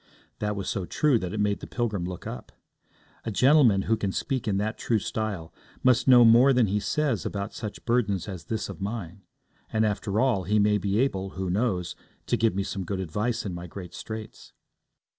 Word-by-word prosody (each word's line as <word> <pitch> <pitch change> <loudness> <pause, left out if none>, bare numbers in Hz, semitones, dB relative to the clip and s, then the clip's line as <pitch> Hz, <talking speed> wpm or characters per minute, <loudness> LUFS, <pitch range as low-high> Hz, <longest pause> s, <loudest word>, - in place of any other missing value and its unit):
That 105 0 -1
was 100 -1 -4
so 95 -3 -2
true 145 -6 +2
that 90 -3 -4
it 105 - -3
made 105 -1 +1
the - - -8
pilgrim 110 -7 -2
look 90 -1 -6
up. 60 - -7 0.7
A - - -3
gentleman 125 -3 +5
who 110 - +2
can 100 -3 -2
speak 130 +2 -2
in 100 -2 +1
that 110 +3 -2
true 115 - +1
style 100 -6 -3 0.3
must 125 0 +4
know 125 -2 +8
more 120 +4 +7
than 125 -2 +4
he 105 +1 0
says 150 +7 0
about 100 +1 -4
such 105 -3 -7
burdens 110 -6 +1
as 90 -6 -7
this 110 +2 -3
of - - -9
mine; 100 -2 -5 0.5
and, 110 0 +2
after 105 0 -1
all, 115 -8 +2
he 105 +3 +2
may 105 0 +3
be 100 +1 0
able, 95 -7 0
who 95 -1 -2
knows, 95 -4 -1 0.3
to - - +1
give 110 -4 +1
me 100 - 0
some 95 -1 -4
good 95 +2 -3
advice 105 +8 -2
in 95 - -3
my 85 0 -6
great 90 0 -9
straits. 110 -1 -8
105 Hz, 205 wpm, -26 LUFS, 95-115 Hz, 0.7 s, know